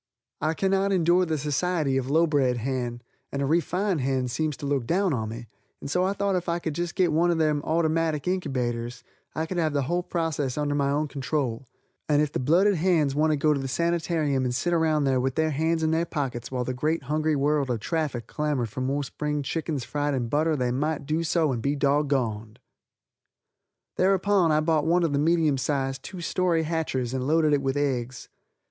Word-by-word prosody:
I 155 +2 0
cannot 195 +1 +1
endure 180 0 +3
the 160 -1 0
society 150 0 0
of 135 0 -1
a - - -2
low 165 +3 +4
bred 135 -6 +1
hen, 120 -1 -3 0.3
and 140 - -3
a 140 - 0
refined 175 +3 0
hen 130 -1 0
seems 150 +4 -2
to 145 - -7
look 140 -4 -1
down 185 -1 +1
on 110 -4 -2
me, 115 +2 -7 0.3
and 140 - -6
so 180 +4 +2
I 190 +1 +1
thought 200 -1 0
if 175 -1 -2
I 170 - +1
could 160 -3 -3 0.2
get 180 -4 +2
one 170 +3 +3
of 170 - +2
those 155 -2 +1
ottymatic 160 -1 0
inkybaters 125 -9 -2 0.3
I 160 - -1
could 175 +2 -3
have 155 -3 +1
the 140 -1 +1
whole 175 +7 0
process 160 -7 -2
under 145 -1 0
my 140 -1 +1
own 150 +2 0
control, 135 -3 -3 0.4
and 145 -1 +4
if 150 -1 +1
the - - -2
blooded 180 +9 +3
hens 160 -5 +2
wanted 155 +2 +2
to - - -13
go 150 - +5
to 140 - -1
the 135 - -3
sanitarium 160 -2 0
and 125 -1 -1
sit 175 +7 0
around 160 -3 +2
there 135 -2 +2
with 130 +1 -1
their 160 0 +1
hands 160 +3 0
in 160 - +2
their 165 +1 +1
pockets 130 -7 -3
while 125 -1 -2
the 130 - -3
great 155 +6 -1
hungry 155 +1 0
world 145 -1 +1
of 120 -2 -1
traffic 150 -3 -2
clamored 145 -6 -2
for 130 - -5
more 140 +3 -1
spring 150 +2 -3
chickens 155 -2 -3
fried 145 -1 -1
in 120 -3 -2
butter 155 +4 +1
they 125 -3 0
might 150 +3 -1
do 155 +3 0
so 160 -2 +1
and 120 -3 -2
be 140 +4 0
doggoned. 135 -7 0 1.4
Thereupon 190 -2 +3
I 155 0 +3
bought 155 -1 +1
one 175 +1 +3
of 160 -4 0
the 140 - +1
medium 155 -3 +2
size, 135 -1 -1
two 180 +6 -8
story 170 -1 +1
hatchers 155 -6 -2
and 130 0 -2
loaded 155 -1 +3
it 145 - +2
with 135 +1 -1
eggs. 130 -3 -2
150 Hz, 215 wpm, -26 LUFS, 135-165 Hz, 1.4 s, go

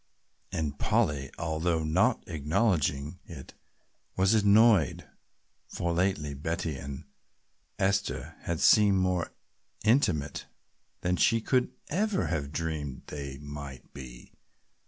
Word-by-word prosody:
And 75 -3 -3
Polly, 70 -3 +1
although 80 0 -1
not 95 +10 +2
acknowledging 80 -2 0
it, 75 -6 -10 0.6
was 95 +3 +4
annoyed, 105 - +4 0.6
for 85 -1 -2
lately 85 -5 0
Betty 80 +2 -3
and 70 +1 -7 0.7
Esther 100 0 -1
had 85 -2 -3
seemed 105 -3 +6
more 90 -2 0 0.5
intimate 105 - +1 0.5
than 90 0 0
she 115 - +3
could 125 +2 +1 0.2
ever 200 +4 0
have 70 -4 -2
dreamed 75 -4 -4
they 70 -2 -6
might 70 -2 -9
be. 65 -3 -11
80 Hz, 105 wpm, -29 LUFS, 70-95 Hz, 0.7 s, seemed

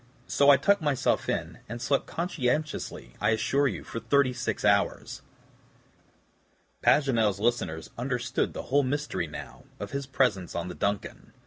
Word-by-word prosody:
So 140 0 +3
I 140 - +9
tucked 200 +3 +3
myself 145 -4 +1
in, - - -2
and 115 - -5
slept 140 +3 0
conscientiously, 150 - -2
I 105 - +3
assure 135 +5 +2
you, - - -4
for 115 - -6
thirty 130 +3 +2
six 125 -3 -3
hours." 100 -1 +1 1.6
Paganel's 115 -9 +3
listeners 95 -9 -1
understood 125 0 -1
the - - -5
whole 145 - +6
mystery, 140 - -2
now, 75 - -9 0.2
of 105 - -6
his 140 -1 -3
presence 125 -9 0
on 85 +1 -3
the - - -5
DUNCAN. 100 0 -3
125 Hz, 145 wpm, -28 LUFS, 105-140 Hz, 1.6 s, I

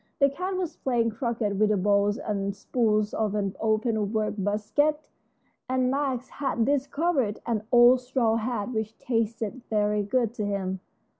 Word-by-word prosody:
The 280 -1 +4
cat 370 +6 -3
was 360 -3 -3
playing 235 -3 0
croquet 225 -2 -2
with 210 +2 +2
the 210 - +2
balls 205 +2 +2
and 200 -7 -3
spools 215 -2 0
of 210 -2 -1
an 200 -2 -1
open 220 -1 0
work 215 -1 0
basket, 215 +10 0 0.7
and 255 0 +1
Max 265 -3 -1
had 265 -5 -1
discovered 280 -3 0
an 225 -3 0
old 245 +1 +7
straw 245 -3 +1
hat 230 -1 -2
which 220 -1 -3
tasted 230 0 -2
very 210 -1 +1
good 230 +2 0
to 220 - -4
him. 190 -2 -2
225 Hz, 155 wpm, -26 LUFS, 210-255 Hz, 0.7 s, old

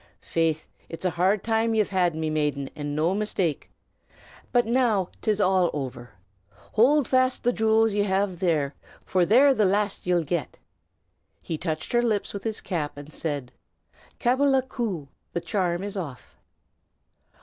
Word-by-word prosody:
"Faith, 165 -2 0 0.2
it's 165 +2 -6
a 180 - +2
hard 185 +4 +1
time 225 0 +1
ye've 215 -2 +2
had, 180 -4 +1
my 160 0 -2
maiden, 150 -3 -1
and 145 -1 -4
no 160 +4 +1
mistake! 195 -6 -1 0.8
But 245 -1 +3
now 225 -6 +2
'tis 215 -1 +1
all 185 -3 +3
over. 130 -4 -5 0.6
Hold 265 +4 +4
fast 255 0 +2
the 245 - +2
jewels 220 -1 +3
ye 205 - +1
have 190 -2 0
there, 155 -6 +1 0.3
for 180 -2 +2
they're 270 +6 +6
the 220 - +2
last 200 0 0
ye'll 175 -2 +2
get." 155 -2 -3 0.8
He 165 - -4
touched 155 0 -4
her 240 - +3
lips 220 -4 -1
with 200 -1 -6
his 220 -2 -3
cap, 155 -6 -3
and 145 +1 -10
said, 145 -6 -4 0.7
"Cabbala 265 +2 +3
ku! 205 - -3 0.3
the 170 - -1
charm 175 -1 -1
is 205 0 -5
off." 150 -10 -7
190 Hz, 155 wpm, -25 LUFS, 160-220 Hz, 0.8 s, they're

